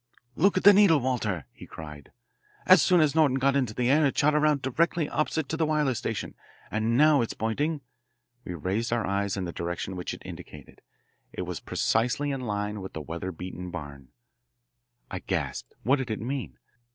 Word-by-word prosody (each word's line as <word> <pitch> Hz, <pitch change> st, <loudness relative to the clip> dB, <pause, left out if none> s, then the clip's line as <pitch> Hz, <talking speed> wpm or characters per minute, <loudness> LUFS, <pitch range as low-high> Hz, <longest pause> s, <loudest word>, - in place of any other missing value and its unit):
"Look 190 Hz, +3 st, +3 dB
at -, -, 0 dB
the 205 Hz, -, +9 dB
needle, 195 Hz, -6 st, +6 dB
Walter!" 110 Hz, -, -1 dB
he -, -, -12 dB
cried. 75 Hz, -3 st, -10 dB, 0.5 s
"As 185 Hz, -3 st, +7 dB
soon 175 Hz, +4 st, +4 dB
as 150 Hz, -2 st, +3 dB
Norton 150 Hz, -5 st, +3 dB
got 135 Hz, +1 st, +2 dB
into 125 Hz, -6 st, 0 dB
the 125 Hz, -1 st, 0 dB
air 155 Hz, +2 st, +4 dB
it 135 Hz, -, -3 dB
shot 150 Hz, +1 st, +4 dB
around 150 Hz, -2 st, +2 dB
directly 165 Hz, +4 st, +1 dB
opposite 155 Hz, 0 st, -1 dB
to 160 Hz, -, -2 dB
the 160 Hz, -, +2 dB
wireless 150 Hz, -6 st, +1 dB
station, -, -, -4 dB, 0.4 s
and 110 Hz, +2 st, +1 dB
now 150 Hz, -1 st, +5 dB
it 115 Hz, -, 0 dB
is -, -, -4 dB
pointing 145 Hz, +8 st, -1 dB, 0.3 s
" 120 Hz, +1 st, -48 dB
We 90 Hz, -, -6 dB
raised 95 Hz, +9 st, -2 dB
our 115 Hz, -2 st, 0 dB
eyes 100 Hz, 0 st, -1 dB
in 95 Hz, -, -2 dB
the 85 Hz, -, -4 dB
direction 85 Hz, +2 st, -4 dB
which 90 Hz, -, -4 dB
it -, -, -15 dB
indicated. -, -, -11 dB, 0.5 s
It -, -, -4 dB
was 90 Hz, -1 st, -5 dB
precisely 125 Hz, +6 st, 0 dB
in 135 Hz, -1 st, -3 dB
line 105 Hz, -2 st, -3 dB
with 95 Hz, -, -8 dB
the 80 Hz, -, -5 dB
weather 85 Hz, +4 st, -5 dB
beaten 90 Hz, +1 st, -7 dB
barn. 70 Hz, -6 st, -8 dB, 1.0 s
I -, -, -3 dB
gasped. -, -, -4 dB
What 135 Hz, +5 st, +3 dB
did 130 Hz, -3 st, -4 dB
it 110 Hz, -, -2 dB
mean? 115 Hz, -, -4 dB
120 Hz, 200 wpm, -27 LUFS, 95-150 Hz, 1.0 s, the